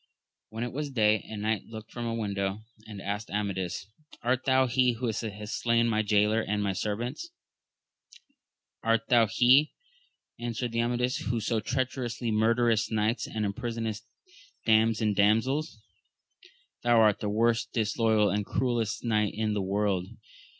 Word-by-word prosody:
When 110 +2 -4
it 120 - -4
was 145 +1 -3
day, 110 -4 +2
a 110 - -6
knight 105 -1 -2
looked 110 -1 -10
from 120 -1 -4
a 115 - -2
window 100 -2 -2 0.3
and 105 -3 -8
asked 100 +3 -4
Amadis, 95 -3 -3 0.4
Art 130 +2 0
thou 130 -1 +4
he 125 0 +2
who 120 +2 -4
hast 110 -2 -4
slain 115 0 +3
my 110 -1 +2
jaylor 105 +1 +2
and 105 -1 -1
my 100 -1 0
servants? 120 - -3 1.5
Art 115 0 +1
thou 115 -2 +5
he, 125 +8 +4 0.7
answered 120 0 -3
Amadis, 120 +2 0
who 120 -1 -2
so 110 +1 0
treacherously 120 0 -2
murderest 115 +1 +2
knights 110 +2 0
and 110 -1 -2
imprisonest 110 +1 -3 0.6
dames 110 0 +3
and 105 -2 +1
damsels? 115 +7 +1 1.0
thou 120 -1 +4
art 105 -2 +4
the 105 - -2
most 115 +2 +1
disloyal 110 -1 +2
and 105 +1 0
cruellest 120 -1 -1
knight 105 -3 +1
in 110 0 -1
the 105 - -1
world 95 -1 0
110 Hz, 145 wpm, -28 LUFS, 105-120 Hz, 1.5 s, thou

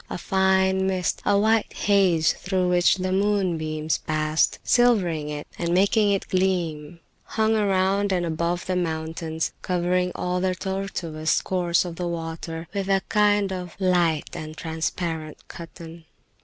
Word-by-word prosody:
A - - -4
fine 190 +1 +2
mist, 185 -2 -1
a 205 - +4
white 220 +1 +2
haze 190 -6 +3
through 185 -1 -1
which 175 0 +4
the 185 0 -2
moonbeams 170 -6 0
passed, 155 0 0
silvering 185 -11 +2
it 150 0 -5
and 170 0 0
making 205 +3 +3
it 195 - -1
gleam, 170 -4 -1 0.3
hung 220 0 +1
around 200 -1 +1
and 180 -2 +1
above 170 +2 -2
the 185 - -1
mountains, 160 -1 -2
covering 180 0 0
all 180 0 -1
the 185 0 0
tortuous 180 -5 -2
course 175 -2 +1
of 170 -2 -7
the 180 - -2
water 165 0 -5
with 200 -1 -2
a 195 -1 +2
kind 205 -2 +2
of 180 -2 -6
light 175 -4 +1
and 155 0 -7
transparent 160 -1 -4
cotton. 165 0 -11
180 Hz, 140 wpm, -24 LUFS, 165-190 Hz, 0.3 s, a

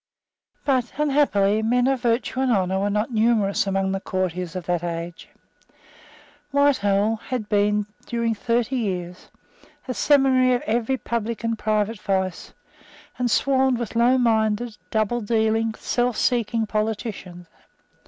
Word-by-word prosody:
But, 255 -4 0
unhappily, 270 -9 +2
men 245 +3 +2
of 265 -1 +1
virtue 235 +1 0
and 265 -1 +2
honour 190 -3 +1
were 200 +1 0
not 210 +4 -1
numerous 215 -3 +2
among 195 0 0
the 195 - -1
courtiers 180 -2 -3
of 180 -2 -5
that 175 -1 -1
age. 170 0 -5 1.2
Whitehall 225 -7 +2
had 240 -1 -5
been, 210 0 +1 0.2
during 235 -1 0
thirty 235 +4 -1
years, 180 -5 -4 0.6
a 255 - -2
seminary 260 -2 +3
of 245 - -3
every 235 +4 0
public 235 -2 -3
and 230 0 0
private 215 0 -1
vice, 190 -2 -2 0.7
and 245 -1 +1
swarmed 265 +1 +2
with 235 -1 -5
lowminded, 230 -2 +2
doubledealing, 220 0 0
selfseeking 235 -2 0
politicians. 210 -5 -4
220 Hz, 125 wpm, -23 LUFS, 200-245 Hz, 1.2 s, seminary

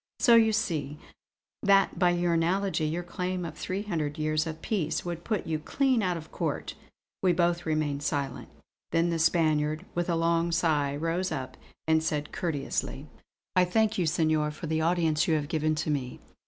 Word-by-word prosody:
So 240 - +5
you 225 -1 +6
see 150 -9 -1 0.6
that 195 -3 +3
by 180 -1 +5
analogy 175 +1 +1
your 165 +3 -2
claim 180 0 -3
of 160 -2 -6
three 190 +5 -3
hundred 160 -7 -2
years 155 +1 0
of 160 0 -5
peace 175 -8 -1
would 170 -1 -4
put 215 -4 -2
you 160 -1 -1
clean 260 - +1
out 180 -3 0
of 155 -1 -10
court." - - -3 0.5
We 185 -2 +3
both 170 0 +1
remained 155 -2 0
silent. 140 -3 -3 0.4
Then 170 +1 +2
the 165 - -1
Spaniard, 155 0 +2
with 175 +1 -1
a 170 - +2
long 165 +1 +1
sigh, 155 -4 +1
rose 165 +4 -1
up 130 -4 -4 0.3
and 160 0 +4
said 150 -1 -2
courteously: 150 -3 -3 0.5
"I 180 - +6
thank 220 +3 +1
you 175 - +1
Senor, 155 -2 +2
for 150 +3 -7
the 160 0 0
audience 165 -2 +2
which - - +2
you 160 - +3
have 150 -2 -1
given 155 -1 0
to 155 0 -1
me. 130 -4 -3
165 Hz, 180 wpm, -28 LUFS, 155-180 Hz, 0.6 s, you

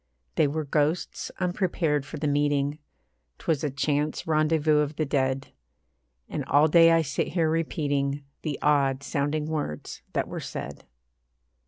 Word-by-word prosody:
They 155 - +3
were 155 +2 -2
ghosts, 150 +4 -1
unprepared 175 -6 0
for 155 - -6
the 150 +1 -1
meeting; 145 0 +1 0.6
'Twas 160 -3 -1
a 150 - +1
chance 145 +2 -1
rendezvous 155 -1 +3
of 150 0 -1
the 155 - 0
dead; 135 -1 0 0.8
And 145 - -3
all 145 +3 +5
day 165 +1 +7
I 165 0 +4
sit 145 0 -1
here 165 -3 +2
repeating 145 -3 -1 0.2
The 150 -3 -3
odd 140 -2 +2
sounding 145 +2 -1
words 150 - -4
that - - 0
were - - -5
said. - - -7
150 Hz, 145 wpm, -26 LUFS, 140-160 Hz, 0.8 s, day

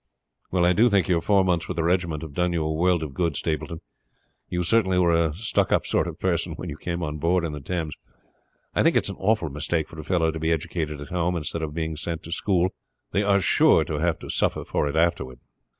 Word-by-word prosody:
"Well, 90 -1 +2
I 90 - +4
do 115 +6 +4
think 100 -6 +2
your 85 -2 +2
four 100 +1 +3
months 85 -3 +1
with - - -5
the 85 - +1
regiment 85 -3 0
have 80 -3 -8
done 90 +1 0
you 80 -2 0
a 80 - -1
world 85 +1 +2
of 75 -3 -6
good, 85 -1 0
Stapleton. 80 0 -3 0.7
You 90 0 -1
certainly 95 -1 +3
were 85 -2 +4
a 85 -1 +2
stuck 105 +5 0
up - - +2
sort - - +1
of 85 -2 -6
personage 85 -2 -1
when 90 - -6
you 70 - -7
came 85 +1 -4
on 75 -1 -4
board 85 +2 +2
in 80 - -3
the 75 -1 -6
Thames. 80 0 -3 0.8
I - - +2
think - - +3
it - - +4
is - - -1
an - - -8
awful 105 -4 +1
mistake 80 +2 -1
for 80 - -11
a - - -6
fellow 80 -1 +1
to 80 - -6
be 80 +1 0
educated 80 -2 -2
at 75 - -8
home, 90 0 0
instead 85 0 -3
of 75 -1 -4
being 80 -1 -2
sent 80 +1 -4
to 85 - -9
school; 90 0 +1 0.4
they 100 - +1
are 100 -1 +3
sure 95 - +4
to 75 - -3
have 85 +1 +1
to - - -5
suffer - - 0
for 75 - -1
it 70 - -3
afterward." 80 -6 0
85 Hz, 250 wpm, -25 LUFS, 80-90 Hz, 0.8 s, I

